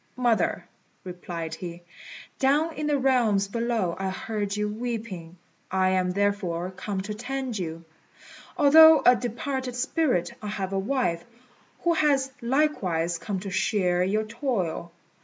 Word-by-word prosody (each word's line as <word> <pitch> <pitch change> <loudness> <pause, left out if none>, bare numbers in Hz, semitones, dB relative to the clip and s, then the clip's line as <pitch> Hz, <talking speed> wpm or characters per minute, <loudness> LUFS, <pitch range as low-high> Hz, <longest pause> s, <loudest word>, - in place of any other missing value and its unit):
"Mother," 240 -3 +1 0.4
replied 175 -3 -6
he, 170 +1 -7 0.6
"down 295 +5 +2
in 300 0 -3
the 295 -1 +2
realms 240 -7 +2
below 230 -5 -1
I 195 0 -1
heard 205 +1 -3
you 210 0 0
weeping. 210 -6 -5 0.3
I 190 0 +2
am 185 -1 +1
therefore 185 -2 -1
come 195 +1 -4
to 210 +2 -5
tend 250 0 -4
you. 165 -1 -5 0.7
Although 315 +2 +8
a 250 - +8
departed 250 +1 -3
spirit, 250 - 0
I 210 - -6
have 195 -2 -3
a 195 - +1
wife, 195 -7 -1 0.6
who 345 -1 +3
has 280 -4 +2
likewise 195 - 0
come 200 -3 -3
to 195 -1 -6
share 180 -3 +1
your 210 +4 +1
toil. 215 - -3
210 Hz, 140 wpm, -26 LUFS, 185-255 Hz, 0.7 s, Although